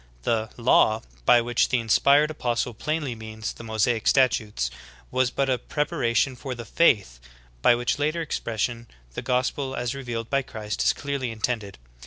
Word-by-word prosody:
" - - -30
The 110 - 0
"law," 115 -2 +3 0.2
by 120 - +7
which 120 +1 +1
the 130 - +2
inspired 140 +7 +4
apostle 120 -4 -1
plainly 150 +2 -2
means 110 0 -6
the - - -11
Mosaic 110 0 0
statutes, 105 - +2 0.4
was 130 0 +2
but 135 +2 -1
a 130 -2 +1
prep 150 -1 -2
aration 130 -4 +1
for 130 +1 -6
the 120 -1 -8
'Taith," 100 - +2 0.4
by 120 - +6
which 120 +4 -1
latter 155 +3 0
expression 115 -4 -3 0.3
the - - -4
gos 125 0 +1
pel 135 -2 -4
as 120 0 -2
revealed 120 -4 -5
by 140 +2 +1
Christ 105 -5 -5
is - - +4
clearly 140 -3 -3
intended. 110 -2 -3
120 Hz, 175 wpm, -25 LUFS, 110-135 Hz, 0.4 s, by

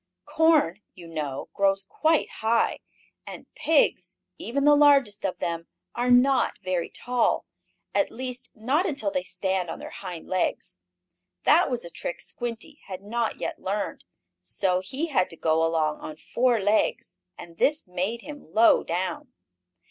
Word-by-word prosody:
Corn, 310 - +3
you 175 - -12
know, 150 -5 -4
grows 195 0 +2
quite 315 +10 +1
high, 225 +1 0 0.5
and - - -8
pigs, 315 -2 +1 0.2
even 280 +4 -1
the 295 - +7
largest 280 -8 +4
of 185 - -5
them, 170 -1 -3 0.3
are 245 +1 -1
not 255 +2 +4
very 185 -2 -1
tall. 245 -1 0 0.5
At 295 - +2
least 250 +1 -6
not 270 - +1
until 295 -1 -1
they 280 -1 0
stand 190 -7 -2
on - - -5
their - - -9
hind 180 -4 -8
legs. 185 - -2 0.6
That - - +5
was 245 -7 -3
a 170 - -9
trick 175 - -5
Squinty 240 +5 -6
had 190 0 -7
not 230 +2 -2
yet - - -4
learned. 200 +2 -3 0.4
So 185 -2 0
he 260 - -3
had 185 -11 +2
to 165 - -11
go 160 0 +2
along 160 -2 +1
on 155 - -7
four 240 +6 +1
legs, 205 - +1 0.2
and 170 -1 -11
this 300 - +1
made 185 +6 -2
him 290 +2 -9
low 225 +4 +5
down. 180 +3 -3
215 Hz, 155 wpm, -26 LUFS, 180-260 Hz, 0.6 s, the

